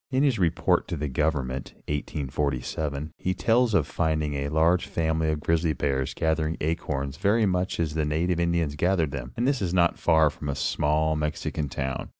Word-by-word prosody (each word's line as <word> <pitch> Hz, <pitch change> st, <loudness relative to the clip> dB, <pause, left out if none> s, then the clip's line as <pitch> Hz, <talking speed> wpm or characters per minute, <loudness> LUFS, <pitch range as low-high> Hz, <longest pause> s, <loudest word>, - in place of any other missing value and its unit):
In 135 Hz, 0 st, +1 dB
his 130 Hz, -7 st, +2 dB
report 85 Hz, -3 st, +2 dB
to -, -, -3 dB
the 75 Hz, +1 st, -2 dB
government 70 Hz, -2 st, -1 dB
1847 75 Hz, +1 st, -2 dB
he 95 Hz, 0 st, -1 dB
tells 115 Hz, -1 st, +2 dB
of 80 Hz, -7 st, +3 dB
finding 80 Hz, -1 st, -1 dB
a 70 Hz, 0 st, -2 dB
large 80 Hz, +4 st, +2 dB
family 80 Hz, -1 st, 0 dB
of 75 Hz, -1 st, -3 dB
grizzly 80 Hz, +1 st, +1 dB
bears 65 Hz, -2 st, -1 dB
gathering 80 Hz, 0 st, 0 dB
acorns 70 Hz, -4 st, -2 dB
very 105 Hz, +4 st, +3 dB
much 90 Hz, -2 st, 0 dB
as 80 Hz, -3 st, 0 dB
the 80 Hz, 0 st, 0 dB
native 80 Hz, +4 st, 0 dB
Indians 85 Hz, -3 st, 0 dB
gathered 85 Hz, -1 st, +1 dB
them, 65 Hz, -3 st, -5 dB
and 120 Hz, +2 st, +1 dB
this 140 Hz, -4 st, +1 dB
not 85 Hz, -1 st, +2 dB
far 80 Hz, -2 st, +4 dB
from 75 Hz, 0 st, -7 dB
a 70 Hz, -, -1 dB
small 75 Hz, +2 st, +1 dB
Mexican 75 Hz, -1 st, -2 dB
town. 65 Hz, 0 st, -3 dB
80 Hz, 175 wpm, -26 LUFS, 75-85 Hz, -, far